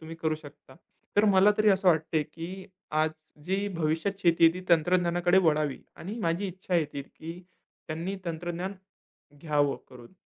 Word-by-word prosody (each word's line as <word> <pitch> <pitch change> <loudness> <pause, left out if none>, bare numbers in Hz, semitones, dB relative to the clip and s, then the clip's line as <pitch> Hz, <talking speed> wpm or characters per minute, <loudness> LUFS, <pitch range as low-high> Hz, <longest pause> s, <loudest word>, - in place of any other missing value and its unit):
तुम्ही 160 +1 -9
करू 160 -1 0
शकता. 145 -3 -14 0.4
तर 205 - +6
मला 195 0 +6
तरी 215 0 +4
असं 190 -1 +3
वाटतंय, 160 -1 +2
की 170 +5 -8 0.2
आज 155 +1 +2 0.3
जी 195 +3 0
भविष्यात 165 +5 -1
शेती 170 -1 +4
आहे 165 - +7
ती 185 - -5
तंत्रज्ञानाकडे 175 +2 +3
वळावी 150 -3 +1 0.2
आणि 205 +7 -6
माझी 170 +2 0
इच्छा 185 0 -5
आहे, 165 -3 +4 0.2
की 165 +5 -10 0.5
त्यांनी 170 +5 -3
तंत्रज्ञान 175 +3 -4 0.6
घ्यावं 145 -2 +1
करून. 125 +3 -14
170 Hz, 150 wpm, -28 LUFS, 155-185 Hz, 0.6 s, आहे